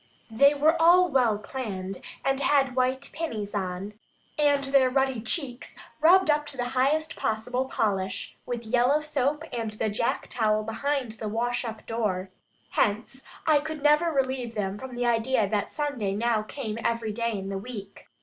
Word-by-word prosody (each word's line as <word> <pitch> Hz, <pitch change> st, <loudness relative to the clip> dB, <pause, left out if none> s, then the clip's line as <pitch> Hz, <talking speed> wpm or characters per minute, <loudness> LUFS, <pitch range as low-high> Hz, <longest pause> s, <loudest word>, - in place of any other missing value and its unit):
They 280 Hz, +6 st, +5 dB
were 315 Hz, +3 st, +3 dB
all 355 Hz, +2 st, +6 dB
well 245 Hz, -7 st, +3 dB
"claned," 200 Hz, -5 st, -5 dB, 0.2 s
and 270 Hz, 0 st, +2 dB
had 275 Hz, -3 st, +2 dB
white 260 Hz, +2 st, 0 dB
pinnies 225 Hz, -11 st, -4 dB
on, 190 Hz, 0 st, -3 dB, 0.4 s
and 290 Hz, -2 st, +3 dB
their 270 Hz, -1 st, +4 dB
ruddy 265 Hz, -2 st, +1 dB
cheeks 260 Hz, 0 st, -3 dB, 0.2 s
rubbed 345 Hz, +2 st, +6 dB
up 295 Hz, 0 st, 0 dB
to 280 Hz, -, -7 dB
the 245 Hz, 0 st, -2 dB
highest 300 Hz, +5 st, +1 dB
possible 235 Hz, +4 st, -1 dB
polish, 195 Hz, -6 st, -2 dB
with 240 Hz, -1 st, -5 dB
yellow 250 Hz, +6 st, +3 dB
soap 300 Hz, 0 st, -1 dB
and 225 Hz, -3 st, -3 dB
the 215 Hz, +1 st, -1 dB
jack 225 Hz, +3 st, -1 dB
towel 215 Hz, -2 st, +1 dB
behind 255 Hz, +3 st, -2 dB
the 220 Hz, 0 st, -6 dB
wash 245 Hz, +3 st, -1 dB
up 220 Hz, -2 st, -7 dB
door. 200 Hz, -5 st, -2 dB, 0.4 s
Hence, 225 Hz, +5 st, 0 dB, 0.2 s
I 310 Hz, -2 st, +5 dB
never 300 Hz, +2 st, +2 dB
could 325 Hz, -, -1 dB
relieve 260 Hz, -3 st, -1 dB
them 200 Hz, -1 st, -2 dB
from 260 Hz, -1 st, -8 dB
the 245 Hz, 0 st, -1 dB
idea 230 Hz, -1 st, +2 dB
that 205 Hz, 0 st, -1 dB
Sunday 255 Hz, -10 st, -2 dB
now 230 Hz, 0 st, +1 dB
came 220 Hz, 0 st, -5 dB
every 230 Hz, -2 st, 0 dB
day 230 Hz, +1 st, -1 dB
in 195 Hz, 0 st, -5 dB
the 195 Hz, 0 st, -3 dB
week. 200 Hz, -3 st, -9 dB
245 Hz, 170 wpm, -27 LUFS, 215-280 Hz, 0.4 s, all